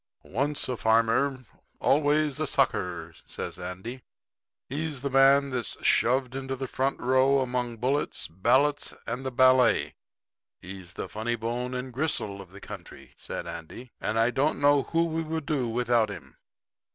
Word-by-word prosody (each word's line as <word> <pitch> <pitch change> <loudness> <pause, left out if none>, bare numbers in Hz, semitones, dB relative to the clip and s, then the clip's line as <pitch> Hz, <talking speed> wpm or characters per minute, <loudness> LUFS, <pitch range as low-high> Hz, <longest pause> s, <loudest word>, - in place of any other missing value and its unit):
'Once 145 +2 -1
a 125 - -1
farmer, 115 +4 +2 0.3
always 150 0 +2
a 155 - 0
sucker,' 90 -12 0
said - - -6
Andy. 95 +8 -6 0.7
'He's 145 -1 -4
the 140 - -2
man 135 +1 +5
that's 125 -4 -3
shoved 125 +1 +3
into 135 0 -4
the 130 0 -4
front 135 +2 -1
row 130 +2 +3
among 125 -2 -2
bullets, 135 +5 -1
ballots 130 - +2
and 120 +3 -3
the 130 - -3
ballet. 130 0 +4 0.7
He's 95 -1 -9
the - - -5
funny 115 +3 -2
bone 120 +2 -3
and 125 0 -5
gristle 115 -8 -1
of 95 -2 -14
the 100 - -11
country,' - - -10
said - - -6
Andy, 115 +10 -8
'and 110 +2 -1
I 115 +2 +3
don't 140 +5 +1
know 145 0 +5
who 165 +6 +1
we 165 0 -2
would 160 -1 -4
do 135 -6 0
without 120 -1 +2
him.' 100 -6 -9
130 Hz, 155 wpm, -27 LUFS, 115-140 Hz, 0.7 s, man